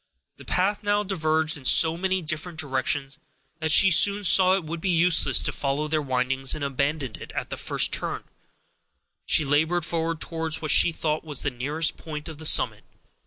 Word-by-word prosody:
The -, -, -15 dB
path 195 Hz, +3 st, -1 dB
now 205 Hz, 0 st, 0 dB
diverged 160 Hz, -5 st, 0 dB
in 135 Hz, -, -15 dB
so 160 Hz, +4 st, +5 dB
many 190 Hz, +1 st, -2 dB
different 160 Hz, +2 st, -4 dB
directions, 135 Hz, 0 st, -3 dB, 0.4 s
that 160 Hz, -1 st, -2 dB
she 195 Hz, +5 st, +6 dB
soon 200 Hz, +5 st, +4 dB
saw 185 Hz, 0 st, +4 dB
it 195 Hz, -, -3 dB
would 160 Hz, +1 st, -7 dB
be 190 Hz, -, -2 dB
useless 175 Hz, -1 st, +4 dB
to -, -, -1 dB
follow 140 Hz, +2 st, -2 dB
their 155 Hz, 0 st, -1 dB
windings, 130 Hz, 0 st, -1 dB
and 150 Hz, -, -7 dB
abandoning 140 Hz, -1 st, -3 dB
it, -, -, -10 dB
at -, -, -6 dB
the -, -, -4 dB
first -, -, 0 dB
turn, -, -, -4 dB, 1.0 s
she 155 Hz, -, +2 dB
labored 160 Hz, +4 st, 0 dB
forward 165 Hz, -1 st, -3 dB
towards 160 Hz, -2 st, -2 dB
what 155 Hz, -1 st, -1 dB
she -, -, +5 dB
thought 155 Hz, -1 st, -3 dB
was 150 Hz, -4 st, -3 dB
the 140 Hz, -, -2 dB
nearest 145 Hz, +6 st, -2 dB
point 150 Hz, -1 st, -8 dB
of 160 Hz, -2 st, -10 dB
the 160 Hz, -, 0 dB
summit. -, -, +2 dB
160 Hz, 190 wpm, -24 LUFS, 145-170 Hz, 1.0 s, she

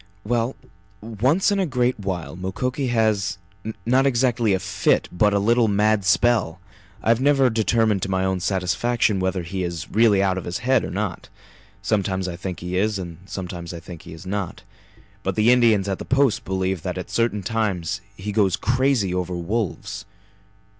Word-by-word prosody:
"Well, 120 Hz, +3 st, 0 dB, 0.4 s
once 125 Hz, -, +1 dB
in 200 Hz, -, +1 dB
a 190 Hz, -, +1 dB
great 125 Hz, -3 st, 0 dB
while 95 Hz, -5 st, -4 dB
Mukoki 125 Hz, +9 st, -2 dB
has 110 Hz, -4 st, +1 dB, 0.5 s
not 130 Hz, +3 st, +3 dB
exactly 120 Hz, -3 st, +2 dB
a -, -, -1 dB
fit, -, -, +1 dB
but 105 Hz, +4 st, +3 dB
a 100 Hz, -, +2 dB
little 115 Hz, +3 st, +3 dB
mad 105 Hz, 0 st, +2 dB
spell! 100 Hz, -3 st, +2 dB, 0.4 s
I -, -, 0 dB
have 115 Hz, +2 st, +4 dB
never 135 Hz, -2 st, +4 dB
determined 110 Hz, -2 st, +2 dB
to 95 Hz, -, -2 dB
my 95 Hz, 0 st, +1 dB
own 95 Hz, -1 st, 0 dB
satisfaction 100 Hz, +4 st, +1 dB
whether 95 Hz, -1 st, -1 dB
he 95 Hz, +2 st, -3 dB
is 85 Hz, -2 st, -5 dB
really 105 Hz, -3 st, +4 dB
out 95 Hz, -1 st, +1 dB
of -, -, -9 dB
his 85 Hz, -, -3 dB
head 130 Hz, 0 st, +3 dB
or -, -, -4 dB
not. 95 Hz, -2 st, -4 dB, 0.5 s
Sometimes 95 Hz, -2 st, 0 dB
I 90 Hz, -, -4 dB
think 90 Hz, 0 st, -6 dB
he 90 Hz, +1 st, -4 dB
is 105 Hz, +2 st, +1 dB
and 85 Hz, -3 st, -7 dB
sometimes 90 Hz, -3 st, -6 dB
I -, -, -6 dB
think 85 Hz, +1 st, -10 dB
he 90 Hz, -3 st, -11 dB
is 80 Hz, +3 st, -11 dB
not. 95 Hz, -1 st, -4 dB, 0.6 s
But -, -, -2 dB
the 110 Hz, +2 st, +4 dB
Indians 115 Hz, -5 st, +4 dB
at 95 Hz, -1 st, -2 dB
the -, -, -6 dB
Post 135 Hz, -3 st, +2 dB
believe 95 Hz, -2 st, -1 dB
that -, -, -4 dB
at -, -, -6 dB
certain 115 Hz, -4 st, 0 dB
times 100 Hz, -4 st, -1 dB, 0.2 s
he 105 Hz, +3 st, -4 dB
goes 100 Hz, -3 st, +2 dB
crazy 125 Hz, -5 st, +1 dB
over 90 Hz, -1 st, -2 dB
wolves." 95 Hz, +3 st, -3 dB
100 Hz, 180 wpm, -23 LUFS, 95-115 Hz, 0.6 s, have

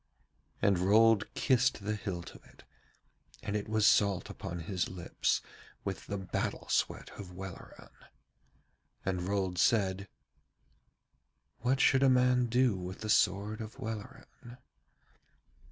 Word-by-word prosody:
And 100 Hz, -3 st, +3 dB
Rold 105 Hz, +3 st, +4 dB
kissed 130 Hz, -4 st, +2 dB
the 105 Hz, -, 0 dB
hilt 95 Hz, -5 st, -5 dB
of -, -, -15 dB
it, -, -, -19 dB, 0.8 s
and 105 Hz, -, -3 dB
it 105 Hz, 0 st, -3 dB
was 110 Hz, -1 st, +2 dB
salt 100 Hz, -3 st, +3 dB
upon 85 Hz, 0 st, -6 dB
his 90 Hz, +1 st, -2 dB
lips 90 Hz, -2 st, -1 dB, 0.4 s
with -, -, -5 dB
the 100 Hz, -, -3 dB
battle 95 Hz, -2 st, -3 dB
sweat -, -, 0 dB
of 95 Hz, -3 st, -8 dB
Welleran. 95 Hz, 0 st, -10 dB, 1.2 s
And 95 Hz, -1 st, -1 dB
Rold 95 Hz, -3 st, -1 dB
said: 100 Hz, -4 st, +2 dB, 1.5 s
'What 130 Hz, +3 st, +1 dB
should 135 Hz, -1 st, +4 dB
a 135 Hz, -, +5 dB
man 125 Hz, -1 st, +3 dB
do 125 Hz, -1 st, +2 dB
with 90 Hz, +2 st, -7 dB
the 110 Hz, -1 st, -1 dB
sword 105 Hz, +4 st, +2 dB
of 110 Hz, +1 st, -8 dB
Welleran?' 110 Hz, +2 st, -8 dB
105 Hz, 125 wpm, -31 LUFS, 95-115 Hz, 1.5 s, a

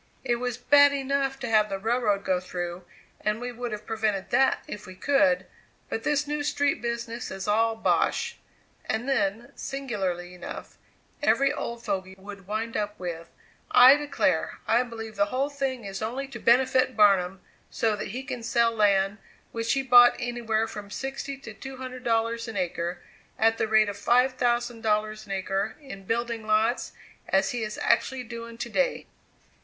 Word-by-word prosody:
It 240 Hz, -2 st, +1 dB
was 245 Hz, -1 st, -3 dB
bad 285 Hz, +3 st, +6 dB
enough 275 Hz, 0 st, -1 dB
to 255 Hz, -, -3 dB
have 215 Hz, -2 st, +3 dB
the 195 Hz, -, -2 dB
railroad 210 Hz, -1 st, 0 dB
go 185 Hz, -1 st, +2 dB
through, 175 Hz, -1 st, -5 dB, 0.3 s
and 210 Hz, +1 st, -1 dB
we 245 Hz, 0 st, -4 dB
would 240 Hz, 0 st, -5 dB
have 210 Hz, 0 st, -6 dB
prevented 215 Hz, -3 st, -1 dB
that 265 Hz, +2 st, +3 dB
if 210 Hz, -, -8 dB
we 185 Hz, -, -10 dB
could; 275 Hz, +4 st, +2 dB, 0.4 s
but 225 Hz, -, -2 dB
this 295 Hz, +3 st, +1 dB
new 295 Hz, 0 st, -2 dB
street 285 Hz, -1 st, 0 dB
business 235 Hz, 0 st, -4 dB
is 190 Hz, 0 st, -6 dB
all 225 Hz, +2 st, +2 dB
bosh!" 465 Hz, -, 0 dB, 0.5 s
And 220 Hz, +4 st, -2 dB
then, 230 Hz, -3 st, 0 dB
singularly 190 Hz, -10 st, -3 dB
enough, 180 Hz, -, -9 dB, 0.4 s
every 275 Hz, +1 st, +3 dB
old 235 Hz, -5 st, -5 dB
fogy 190 Hz, 0 st, -3 dB
would 200 Hz, -1 st, -11 dB
wind 220 Hz, +2 st, -3 dB
up 210 Hz, 0 st, -2 dB
with: 170 Hz, -2 st, -5 dB, 0.4 s
"I 255 Hz, +3 st, +9 dB
declare, 280 Hz, -, 0 dB
I 235 Hz, +2 st, +4 dB
believe 225 Hz, -3 st, -7 dB
the 200 Hz, -, +4 dB
whole 270 Hz, +6 st, -1 dB
thing 265 Hz, -5 st, -3 dB
is 195 Hz, 0 st, -6 dB
only 250 Hz, +5 st, -3 dB
to 250 Hz, -4 st, -8 dB
benefit 255 Hz, +1 st, +3 dB
Barnum, 195 Hz, -3 st, +4 dB, 0.3 s
so 220 Hz, -2 st, 0 dB
that 205 Hz, -, -5 dB
he 250 Hz, +7 st, -5 dB
can 255 Hz, -3 st, -5 dB
sell 230 Hz, 0 st, +2 dB
land, 200 Hz, -2 st, +2 dB, 0.3 s
which 230 Hz, 0 st, -1 dB
he 270 Hz, 0 st, 0 dB
bought 245 Hz, -1 st, +7 dB
anywhere 235 Hz, -3 st, -1 dB
from 210 Hz, -2 st, -8 dB
sixty 270 Hz, +3 st, -5 dB
to 270 Hz, -5 st, -10 dB
two 265 Hz, +5 st, -9 dB
hundred 255 Hz, -1 st, -7 dB
dollars 230 Hz, 0 st, 0 dB
an 225 Hz, -2 st, -5 dB
acre, 175 Hz, -1 st, -3 dB, 0.3 s
at 225 Hz, +1 st, +3 dB
the -, -, +1 dB
rate 215 Hz, 0 st, +4 dB
of 205 Hz, 0 st, -5 dB
five 250 Hz, +4 st, +3 dB
thousand 240 Hz, -2 st, 0 dB
dollars 215 Hz, 0 st, -1 dB
an -, -, -8 dB
acre 195 Hz, +2 st, -2 dB
in 270 Hz, -10 st, -10 dB
building 230 Hz, 0 st, -2 dB
lots, 215 Hz, +3 st, +1 dB, 0.4 s
as 195 Hz, -, +2 dB
he 245 Hz, -, -3 dB
is 215 Hz, -1 st, -4 dB
actually 255 Hz, +2 st, +1 dB
doing 235 Hz, -1 st, -8 dB
to -, -, -4 dB
day." -, -, 0 dB
230 Hz, 175 wpm, -26 LUFS, 205-255 Hz, 0.5 s, I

